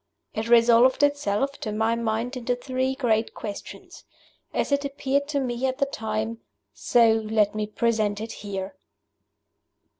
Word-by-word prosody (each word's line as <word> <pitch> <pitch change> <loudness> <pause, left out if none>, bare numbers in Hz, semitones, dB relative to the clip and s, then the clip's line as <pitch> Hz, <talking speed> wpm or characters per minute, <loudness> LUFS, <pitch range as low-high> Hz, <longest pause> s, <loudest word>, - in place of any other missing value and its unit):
It 225 +1 -3
resolved 240 +3 +5
itself, 275 -2 0
to 215 - -4
my 220 +2 +1
mind, 230 +2 -2
into 245 0 -1
three 260 +1 -2
great 225 -4 0
Questions. 205 -2 -8 0.5
As - - -1
it 280 0 +2
appeared 280 0 -1
to 290 -1 -1
me 250 0 -1
at 260 0 -2
the 280 - +2
time, 220 -3 -3 0.3
so 235 -2 +4
let 215 -1 +1
me 215 0 -2
present 215 -2 0
it 225 +1 -5
here. 195 -1 -5
230 Hz, 145 wpm, -25 LUFS, 220-260 Hz, 0.5 s, resolved